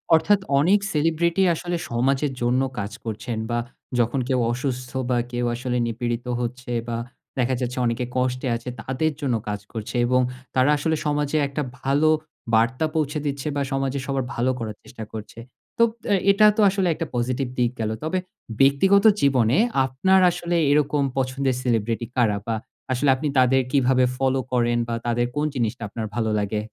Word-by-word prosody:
অর্থাৎ, 195 Hz, +6 st, +3 dB, 0.2 s
অনেক 190 Hz, +7 st, +4 dB
সেলিব্রিটি 165 Hz, +4 st, +1 dB
আসলে 175 Hz, +1 st, -3 dB
সমাজের 135 Hz, +4 st, +1 dB
জন্য 120 Hz, +2 st, +2 dB, 0.2 s
কাজ 100 Hz, +1 st, -4 dB
করছেন, 110 Hz, +1 st, -4 dB
বা 120 Hz, 0 st, 0 dB, 0.4 s
যখন 120 Hz, +3 st, +1 dB
কেউ 130 Hz, -1 st, +2 dB
অসুস্থ, 125 Hz, 0 st, -3 dB, 0.2 s
বা 125 Hz, -, +2 dB
কেউ 120 Hz, 0 st, -1 dB
আসলে 125 Hz, 0 st, -2 dB
নিপীড়িত 120 Hz, +1 st, -3 dB
হচ্ছে, 125 Hz, +1 st, -4 dB, 0.2 s
বা 115 Hz, -, -2 dB, 0.4 s
দেখা 130 Hz, +1 st, +1 dB
যাচ্ছে 125 Hz, 0 st, -3 dB
অনেকে 120 Hz, +1 st, 0 dB
কষ্টে 125 Hz, +1 st, 0 dB
আছে, 115 Hz, +2 st, -6 dB
তাদের 145 Hz, +5 st, -1 dB
জন্য 130 Hz, -4 st, +1 dB
কাজ 105 Hz, -1 st, -2 dB
করছে। 110 Hz, +1 st, -6 dB
এবং 125 Hz, +1 st, +3 dB, 0.3 s
তারা 130 Hz, +2 st, +4 dB
আসলে 160 Hz, +2 st, 0 dB
সমাজে 150 Hz, 0 st, 0 dB
একটা 140 Hz, +2 st, -3 dB, 0.2 s
ভালো 145 Hz, +3 st, +3 dB, 0.5 s
বার্তা 120 Hz, +7 st, +2 dB
পৌঁছে 150 Hz, -1 st, 0 dB
দিচ্ছে 140 Hz, 0 st, -3 dB
বা 140 Hz, -, 0 dB
সমাজে 135 Hz, 0 st, -1 dB
সবার 135 Hz, -2 st, -1 dB
ভালো 125 Hz, +2 st, +1 dB
করার 110 Hz, -2 st, -4 dB
চেষ্টা 110 Hz, -, -9 dB
করছে। 110 Hz, +1 st, -8 dB, 0.4 s
তো, 230 Hz, -, +5 dB, 0.2 s
অ্যা 205 Hz, -, +3 dB
এটা 210 Hz, +2 st, +5 dB
তো -, -, +4 dB
আসলে 190 Hz, -1 st, 0 dB
একটা 165 Hz, -, -3 dB
পজিটিভ 125 Hz, +2 st, -1 dB
দিক 120 Hz, 0 st, +2 dB
গেল। 110 Hz, -, -1 dB
তবে 160 Hz, +4 st, -1 dB, 0.4 s
ব্যক্তিগত 190 Hz, +10 st, +5 dB, 0.2 s
জীবনে 130 Hz, -3 st, +3 dB, 0.3 s
আপনার 185 Hz, +9 st, +3 dB
আসলে 175 Hz, +1 st, -2 dB, 0.2 s
এরকম 145 Hz, 0 st, +2 dB
পছন্দের 130 Hz, 0 st, 0 dB
সেলিব্রিটি 115 Hz, -1 st, 0 dB
কারা? 110 Hz, -5 st, +2 dB
বা 115 Hz, -, 0 dB, 0.4 s
আসলে 130 Hz, +2 st, +2 dB
আপনি 150 Hz, +3 st, -3 dB
তাদের 130 Hz, +1 st, +5 dB
কিভাবে 130 Hz, -2 st, +3 dB
ফলো 135 Hz, 0 st, +1 dB
করেন? 120 Hz, -1 st, +2 dB
বা 115 Hz, -, -2 dB
তাদের 120 Hz, +1 st, +1 dB
কোন 150 Hz, +1 st, +1 dB
জিনিসটা 120 Hz, -1 st, -2 dB
আপনার 110 Hz, +1 st, -4 dB
ভালো 110 Hz, -2 st, 0 dB
লাগে? 105 Hz, +1 st, -2 dB
130 Hz, 170 wpm, -23 LUFS, 120-145 Hz, 0.5 s, তো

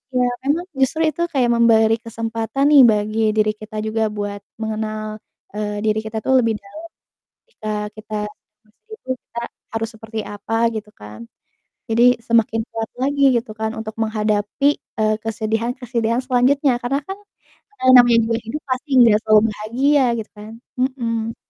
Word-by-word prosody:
ya 250 Hz, 0 st, +3 dB, 0.2 s
memang 305 Hz, +6 st, 0 dB
justru 270 Hz, +4 st, +1 dB
itu 325 Hz, +4 st, -6 dB
kayak 265 Hz, -7 st, +1 dB
memberi 225 Hz, -1 st, +4 dB
kesempatan 230 Hz, +3 st, -2 dB
nih 285 Hz, -2 st, +9 dB
bagi 215 Hz, 0 st, +1 dB, 0.2 s
diri 215 Hz, 0 st, +3 dB
kita 215 Hz, 0 st, -12 dB
juga 220 Hz, 0 st, 0 dB
buat 205 Hz, 0 st, -4 dB, 0.2 s
mengenal, 215 Hz, 0 st, -4 dB, 0.3 s
eee, 210 Hz, 0 st, -3 dB
diri 215 Hz, 0 st, +2 dB
kita 220 Hz, 0 st, -5 dB
tuh 265 Hz, -, +2 dB
lebih 230 Hz, -2 st, +1 dB
dalam 200 Hz, +11 st, -11 dB, 0.7 s
jika 215 Hz, -, -7 dB, 0.3 s
kita 215 Hz, 0 st, -9 dB, 0.5 s
meskipun 260 Hz, -, -8 dB
kita 235 Hz, -, -8 dB, 0.3 s
harus 225 Hz, 0 st, -1 dB
seperti 220 Hz, 0 st, -8 dB
apa 205 Hz, +2 st, -6 dB, 0.2 s
gitu 210 Hz, -1 st, -6 dB
kan. 105 Hz, +2 st, -11 dB, 0.6 s
Jadi 230 Hz, +1 st, +3 dB, 0.2 s
semakin 230 Hz, -1 st, +2 dB
kuat 225 Hz, -1 st, -4 dB
lagi 280 Hz, +2 st, 0 dB
gitu 235 Hz, -1 st, -3 dB
kan 220 Hz, 0 st, -2 dB
untuk 220 Hz, -1 st, -6 dB
menghadapi, 215 Hz, +4 st, 0 dB, 0.3 s
eee, 215 Hz, 0 st, +3 dB
kesedihan-kesedihan 230 Hz, +2 st, -1 dB
selanjutnya 255 Hz, +1 st, +2 dB
karena 260 Hz, +3 st, 0 dB
kan, 385 Hz, -, -4 dB, 0.7 s
eee, -, -, +6 dB
namanya 240 Hz, -1 st, +7 dB
juga 230 Hz, 0 st, 0 dB
hidup 295 Hz, +7 st, -5 dB
pasti 255 Hz, +4 st, -3 dB
nggak 230 Hz, -4 st, +7 dB
selalu 215 Hz, -1 st, +5 dB
bahagia 260 Hz, +7 st, +1 dB
gitu 220 Hz, -1 st, -6 dB
kan, 210 Hz, +1 st, -10 dB, 0.3 s
mhm. 230 Hz, -4 st, -2 dB
225 Hz, 150 wpm, -20 LUFS, 215-250 Hz, 0.7 s, nih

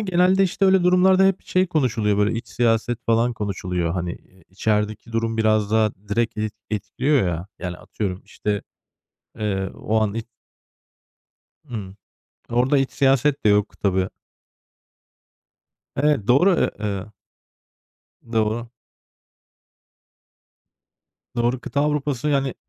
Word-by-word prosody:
genelde 185 Hz, -1 st, +3 dB
işte 195 Hz, +1 st, +1 dB
öyle 190 Hz, -2 st, +4 dB
durumlarda 185 Hz, +1 st, +5 dB
hep 195 Hz, -1 st, +1 dB
şey 185 Hz, +1 st, +2 dB
konuşuluyor 115 Hz, -, +1 dB
böyle, 105 Hz, +2 st, +2 dB
iç -, -, -9 dB
siyaset 120 Hz, 0 st, +1 dB
falan 115 Hz, +1 st, +2 dB
konuşuluyor. 90 Hz, -5 st, -2 dB
Hani, 90 Hz, -1 st, -2 dB
eee, 95 Hz, -2 st, -16 dB
içerideki 105 Hz, +3 st, -1 dB
durum 115 Hz, 0 st, -1 dB
biraz 110 Hz, -2 st, +2 dB
daha 110 Hz, -1 st, +3 dB, 0.2 s
direkt 115 Hz, +1 st, 0 dB
et 110 Hz, -1 st, -2 dB, 0.2 s
etkiliyor 110 Hz, +4 st, +1 dB
ya. 85 Hz, +1 st, -3 dB
Yani 90 Hz, -1 st, -5 dB
atıyorum 95 Hz, -3 st, -5 dB
işte, 105 Hz, -1 st, -3 dB, 0.8 s
eee, 95 Hz, -3 st, -1 dB
o 110 Hz, +1 st, 0 dB
an 105 Hz, -2 st, 0 dB
i 115 Hz, -, -2 dB, 1.5 s
Imm. 100 Hz, -5 st, -6 dB, 0.5 s
Orada 125 Hz, +4 st, +2 dB
iç 135 Hz, -2 st, 0 dB
siyaset 135 Hz, +1 st, +2 dB
de 105 Hz, -, +5 dB
yok 105 Hz, 0 st, +1 dB
tabii. 95 Hz, -1 st, +1 dB, 1.9 s
Evet, 140 Hz, -7 st, +2 dB
doğru. 175 Hz, +11 st, +5 dB
E -, -, +1 dB
eee 100 Hz, -2 st, -2 dB, 1.3 s
Doğru. 110 Hz, +1 st, 0 dB, 2.7 s
Doğru. 120 Hz, +2 st, +1 dB
Kıta 140 Hz, -, -2 dB
Avrupa'sı 150 Hz, -2 st, 0 dB
yani 135 Hz, -3 st, +1 dB
115 Hz, 120 wpm, -22 LUFS, 105-140 Hz, 2.7 s, durumlarda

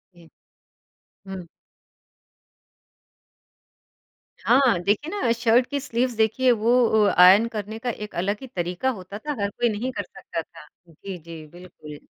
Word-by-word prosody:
जी। 170 Hz, -2 st, -18 dB, 1.0 s
हुँ। 185 Hz, -3 st, -7 dB, 2.9 s
हाँ, 245 Hz, -7 st, +3 dB
देखिए 215 Hz, -, 0 dB
ना 235 Hz, -, +2 dB
शर्ट 235 Hz, +1 st, +3 dB
की 285 Hz, -1 st, -2 dB
स्लीव्स 250 Hz, -2 st, -1 dB
देखिए, 225 Hz, +4 st, +2 dB
वो 230 Hz, +1 st, +1 dB, 0.3 s
ओ 210 Hz, -, +5 dB
आयन 190 Hz, +6 st, +7 dB
करने 215 Hz, +2 st, -5 dB
का 245 Hz, -, -3 dB
एक 210 Hz, -4 st, -7 dB
अलग 200 Hz, +4 st, -1 dB
ही 265 Hz, -, -8 dB
तरीका 180 Hz, +3 st, -2 dB
होता 200 Hz, -3 st, -6 dB
था। 295 Hz, +6 st, -5 dB
हर 200 Hz, -, 0 dB
कोई 240 Hz, +3 st, 0 dB
नहीं 230 Hz, +5 st, -3 dB
कर 205 Hz, -, -4 dB
सकता 165 Hz, -2 st, -7 dB
था। 150 Hz, -1 st, -15 dB, 0.2 s
जी, 185 Hz, +4 st, -9 dB
जी। 165 Hz, -1 st, -11 dB
बिल्कुल। 155 Hz, -3 st, -12 dB
210 Hz, 145 wpm, -24 LUFS, 180-240 Hz, 2.9 s, आयन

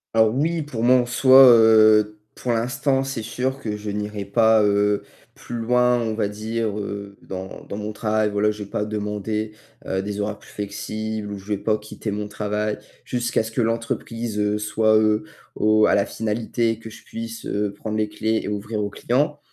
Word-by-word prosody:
Ah 110 Hz, -, +7 dB
oui, 155 Hz, +9 st, 0 dB
pour 125 Hz, -6 st, -5 dB
moi, 125 Hz, +2 st, +5 dB
en 125 Hz, -1 st, +3 dB
soi, 130 Hz, +2 st, +7 dB
heu, 110 Hz, -2 st, +5 dB, 0.2 s
pour 125 Hz, -, -3 dB
l'instant, 135 Hz, +4 st, +1 dB
c'est 135 Hz, -3 st, -4 dB
sûr 130 Hz, +4 st, -3 dB
que 105 Hz, -5 st, -4 dB
je 105 Hz, 0 st, -5 dB
n'irai 105 Hz, 0 st, -4 dB
pas, 110 Hz, +1 st, +4 dB
heu, 105 Hz, 0 st, +2 dB, 0.3 s
plus 120 Hz, -, -7 dB
loin, 125 Hz, +1 st, +3 dB
on 110 Hz, -1 st, -2 dB
va 110 Hz, -2 st, 0 dB
dire, 110 Hz, +1 st, -3 dB
heu, 100 Hz, -1 st, -6 dB
dans 95 Hz, 0 st, -7 dB
dans 100 Hz, -, -4 dB
mon 105 Hz, 0 st, -4 dB
travail, 110 Hz, -1 st, 0 dB
voilà, 105 Hz, +1 st, +2 dB
j'ai 105 Hz, -1 st, -4 dB
pas 105 Hz, +1 st, -3 dB
demandé, 105 Hz, 0 st, -3 dB, 0.3 s
heu, 95 Hz, 0 st, -1 dB
des 100 Hz, +1 st, -4 dB
horaires 105 Hz, 0 st, -3 dB
plus -, -, -17 dB
flexibles 105 Hz, +1 st, -5 dB
ou 100 Hz, -, -5 dB
je 95 Hz, -, -13 dB
vais 105 Hz, -1 st, -2 dB
pas 110 Hz, +1 st, +1 dB
quitter 105 Hz, +1 st, -7 dB
mon 105 Hz, 0 st, -3 dB
travail 105 Hz, 0 st, -2 dB, 0.3 s
jusqu'à 120 Hz, -2 st, 0 dB
ce 110 Hz, -, -7 dB
que 115 Hz, -, 0 dB
l'entreprise, 115 Hz, -1 st, -2 dB
heu, 105 Hz, 0 st, +1 dB
soit, 110 Hz, +1 st, +2 dB
heu, 110 Hz, +5 st, +2 dB, 0.3 s
au 110 Hz, 0 st, +3 dB
à -, -, +3 dB
la 100 Hz, 0 st, +2 dB
finalité 115 Hz, +1 st, -1 dB
que 110 Hz, -, -9 dB
je 110 Hz, -, -13 dB
puisse, 115 Hz, 0 st, -7 dB
heu, 105 Hz, 0 st, -1 dB
prendre 105 Hz, +2 st, -5 dB
les 105 Hz, -1 st, 0 dB
clés 110 Hz, +1 st, -1 dB
et -, -, -5 dB
ouvrir 105 Hz, +1 st, -3 dB
aux 100 Hz, -, -2 dB
clients 145 Hz, +8 st, 0 dB
110 Hz, 195 wpm, -23 LUFS, 105-115 Hz, 0.3 s, Ah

